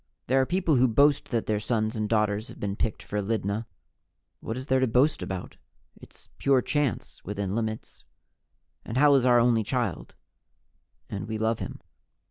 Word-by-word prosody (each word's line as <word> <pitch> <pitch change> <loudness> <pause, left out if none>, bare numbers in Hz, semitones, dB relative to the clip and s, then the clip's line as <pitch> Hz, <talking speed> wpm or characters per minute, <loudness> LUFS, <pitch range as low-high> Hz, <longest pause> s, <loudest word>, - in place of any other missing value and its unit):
There 130 +2 +3
are 130 - 0
people 175 -5 +2
who 130 +1 +5
boast 140 +5 +3
that 115 -2 -1
their 105 -1 0
sons 110 0 -1
and 110 -1 -2
daughters 105 -1 +1
have - - -11
been 100 -1 -2
picked 110 - -2
for 105 0 -3
Lydna. 105 +1 -2 0.7
What 110 - -5
is 130 - -6
there 130 -2 +2
to 130 - +2
boast 125 +5 +2
about? 90 0 -6 0.4
It's - - -16
pure 135 -3 +3
chance, 145 -4 -2
within 100 -1 -3
limits. 110 0 -4 0.8
And 115 - -5
Hal 145 +1 +6
is 130 -2 +3
our 120 -1 +6
only 115 -2 +3
child - - -3 0.9
and 100 -1 -5
we 110 0 -3
love 110 +1 0
him. - - -6
115 Hz, 175 wpm, -27 LUFS, 105-130 Hz, 0.9 s, Hal